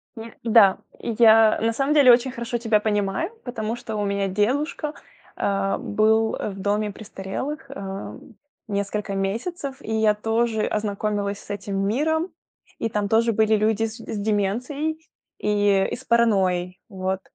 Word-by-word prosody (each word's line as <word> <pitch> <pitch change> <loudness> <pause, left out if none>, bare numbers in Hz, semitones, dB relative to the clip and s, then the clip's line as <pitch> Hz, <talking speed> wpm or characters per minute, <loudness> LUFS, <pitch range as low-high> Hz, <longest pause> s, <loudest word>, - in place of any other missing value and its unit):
Не 225 0 -9
Да. 220 -4 +5 0.2
Я 225 -1 +5
на 225 +1 +2
самом 275 +5 +1
деле 280 -4 +7
очень 245 +2 +4
хорошо 235 0 -3
тебя 225 -2 +2
понимаю, 205 - -1
потому 230 -2 -3
что 240 -2 -6
у 210 - -1
меня 200 0 0
дедушка, 280 - -1 0.4
э, 195 0 0
был, 220 +1 +2
э, - - -3
в 195 -1 -8
доме 205 +2 0
престарелых, 225 +8 -6
э, 195 -7 -6 0.5
несколько 200 0 -2
месяцев. 265 - -3
И 220 - -4
я 220 -1 +3
тоже 225 +1 0
ознакомилась 205 -1 -2
с - - -17
этим 200 -1 -4
миром. 315 - 0 0.5
И 225 - -1
там 210 -1 -1
тоже 230 +2 +3
были 220 0 +3
люди 215 +1 +1
с 225 +1 -6
с 225 -2 -6
деменцией 235 +10 -1 0.4
и 205 -2 +2
и - - -1
с 255 - -12
паранойей. 190 -7 +2
Вот. 190 -1 -2
215 Hz, 150 wpm, -23 LUFS, 200-235 Hz, 0.5 s, деле